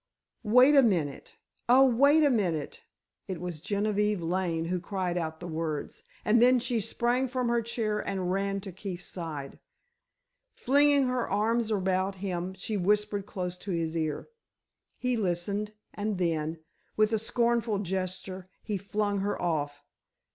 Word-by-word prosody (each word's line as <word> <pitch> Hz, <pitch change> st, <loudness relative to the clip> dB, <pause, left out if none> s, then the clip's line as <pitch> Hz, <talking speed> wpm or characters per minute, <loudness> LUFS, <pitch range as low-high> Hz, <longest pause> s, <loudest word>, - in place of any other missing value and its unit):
"Wait 250 Hz, +6 st, +6 dB
a 275 Hz, -, +8 dB
minute! 170 Hz, -, -1 dB, 0.3 s
Oh, 260 Hz, +2 st, +7 dB
wait 280 Hz, +5 st, +5 dB
a 290 Hz, -, +4 dB
minute!" 175 Hz, -, -1 dB, 0.4 s
It 185 Hz, -3 st, -4 dB
was 175 Hz, -3 st, -5 dB
Genevieve 210 Hz, +1 st, 0 dB
Lane 170 Hz, -1 st, -1 dB
who 180 Hz, +2 st, -1 dB
cried 180 Hz, -1 st, -2 dB
out 160 Hz, -2 st, -3 dB
the 180 Hz, -, -7 dB
words, 160 Hz, -2 st, -4 dB, 0.2 s
and 230 Hz, +2 st, +4 dB
then 250 Hz, +1 st, +6 dB
she 240 Hz, -1 st, 0 dB
sprang 240 Hz, +4 st, 0 dB
from 250 Hz, -1 st, -1 dB
her 235 Hz, 0 st, +2 dB
chair 220 Hz, -2 st, -1 dB
and 190 Hz, -3 st, -2 dB
ran 195 Hz, +1 st, -1 dB
to 195 Hz, -1 st, -7 dB
Keefe's 185 Hz, -1 st, -7 dB
side. 155 Hz, -6 st, -6 dB, 1.0 s
Flinging 285 Hz, +1 st, +4 dB
her 250 Hz, -1 st, -1 dB
arms 225 Hz, +3 st, +1 dB
about 190 Hz, -1 st, 0 dB
him, 185 Hz, -1 st, -4 dB
she 205 Hz, +3 st, -3 dB
whispered 205 Hz, +1 st, +1 dB
close 180 Hz, -3 st, -4 dB
to 200 Hz, -, -9 dB
his 165 Hz, -2 st, -1 dB
ear. 155 Hz, -2 st, -2 dB, 0.7 s
He 250 Hz, -1 st, 0 dB
listened, 200 Hz, +2 st, -1 dB, 0.2 s
and 210 Hz, -1 st, -2 dB
then, 165 Hz, -2 st, -1 dB, 0.4 s
with 215 Hz, +1 st, +3 dB
a 220 Hz, -, +2 dB
scornful 235 Hz, -1 st, +1 dB
gesture 185 Hz, -1 st, -4 dB
he 210 Hz, -2 st, -2 dB
flung 205 Hz, +1 st, -1 dB
her 205 Hz, +1 st, -1 dB
off. 145 Hz, -4 st, -2 dB
200 Hz, 150 wpm, -29 LUFS, 175-225 Hz, 1.0 s, a